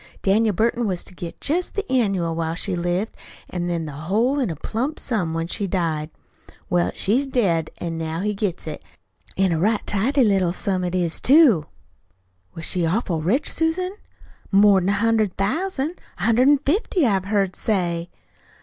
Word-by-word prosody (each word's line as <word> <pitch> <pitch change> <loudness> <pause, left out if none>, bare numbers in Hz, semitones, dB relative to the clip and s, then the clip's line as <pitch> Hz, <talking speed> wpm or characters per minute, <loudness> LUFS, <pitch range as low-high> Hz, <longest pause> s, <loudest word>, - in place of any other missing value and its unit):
Daniel 210 +1 +3
Burton 235 +3 +1
was 185 -3 -2
to - - -12
get 170 -1 -8
jest 345 +5 -1
the 405 0 -2
annual 195 -10 +1
while 165 0 -2
she 185 +1 -1
lived, 175 +5 -2 0.4
an' 175 -1 -2
then 170 -2 -2
the 150 - -6
whole 210 - 0
in 255 - 0
a 165 - -3
plump 240 - -3
sum 180 -10 -2
when 165 0 -1
she 200 +4 -2
died. 165 -5 -1 0.6
Well, 175 -1 +2
she's 255 +8 +1
dead, 180 -12 +1
an' 165 -1 -4
now 160 +1 -3
he 210 +1 0
gets 200 -3 -3
it. - - -6 0.5
An' 190 -1 +2
a 165 - 0
right 210 +4 +1
tidy 255 +7 +2
little 190 -5 +2
sum 185 0 -1
it 180 0 -2
is, 175 -3 0
too." 260 - +5 0.9
"Was 165 - -6
she 180 -2 0
awful 170 -1 0
rich, 230 - +1
Susan?" 330 +3 0 0.6
"More'n 195 -2 +5
a - - +3
hundred 215 -2 +1
thousand. 315 - -1 0.2
A 180 - -6
hundred 230 +4 +4
an' 290 - +6
fifty, 350 - +1
I've 195 -5 +1
heard 195 -2 0
say." 175 -5 -1
195 Hz, 175 wpm, -22 LUFS, 175-235 Hz, 0.9 s, an